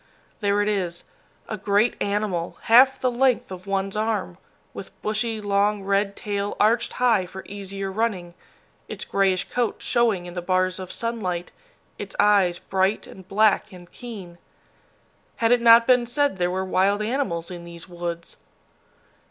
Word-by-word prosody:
There 205 -1 +1
it - - -2
is, 185 -5 -2 0.4
a 215 - -4
great 205 +3 +2
animal, 200 -4 -2
half 255 +4 +6
the 255 - +1
length 250 -3 +1
of 185 +1 -9
one's 195 0 -1
arm, 210 -5 -2 0.3
with 190 - -10
bushy, 215 +1 -1
long 205 0 +1
red 200 +1 0
tail 205 -2 -3
arched 225 +3 +2
high 225 -7 +2
for 190 +1 -9
easier 195 -1 -6
running, 190 -5 -2 0.5
its - - -7
grayish 195 -2 +1
coat 245 -2 0
showing 225 -7 +1
in 175 - -8
the 175 - -4
bars 185 +1 0
of 185 -1 -7
sunlight, 190 -7 -3 0.5
its - - -7
eyes 195 -4 +4
bright 190 +3 0
and 190 -1 -13
black 215 +2 +2
and 175 -2 -14
keen. 195 -8 -10 1.0
Had 230 0 +1
it 245 -1 +4
not 230 0 +7
been 250 -1 +3
said 285 -3 0
there 175 -1 +1
were 190 +1 -2
wild 195 +3 +1
animals 210 -8 -2
in 175 -1 -8
these 170 0 -10
woods? 170 -1 -6
200 Hz, 155 wpm, -24 LUFS, 185-220 Hz, 1.0 s, not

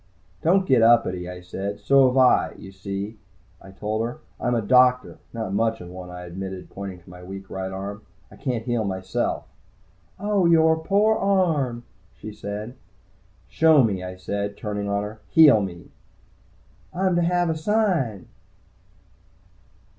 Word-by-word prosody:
"Don't 185 +4 +3
get 130 -7 +4
uppity," 95 -6 +3
I 90 0 -8
said. 100 +3 -5
"So 135 -1 +5
have 125 +1 0
I. 130 -1 +4
You 95 - -11
see," 100 +3 -6 0.4
I 95 - -13
told 105 +3 -3
her. 120 +1 -4 0.2
"I'm 120 0 0
a 115 - +1
doctor. 125 +3 +3
Not 110 -5 -4
much 115 +2 0
of 90 - -9
a - - -12
one," 90 0 -9
I 90 0 -8
admitted, 95 +1 -7
pointing 95 -2 -7
to - - -17
my 90 0 -12
weak 95 +1 -9
right 95 0 -4
arm. 100 +2 -6 0.3
"I - - -13
can't 125 -5 -3
heal 120 -2 0
myself." 95 -1 -2 0.7
"Oh, 200 -3 +1
yore 160 -1 +4
pore 210 +5 +2
arm," 160 -12 +1 0.3
she 110 0 -8
said. 105 +3 -6 0.7
"Show 160 -4 +5
me," 100 -5 -1
I 90 0 -6
said, 100 +2 -4
turning 105 -1 -4
on 100 0 0
her. 105 +2 -8
"Heal 150 -9 +7
me!" 90 -3 -7 1.0
"I'm 185 0 0
to - - +3
have 175 0 +1
a - - -2
sign!" 160 - 0
110 Hz, 160 wpm, -24 LUFS, 95-145 Hz, 1.0 s, Heal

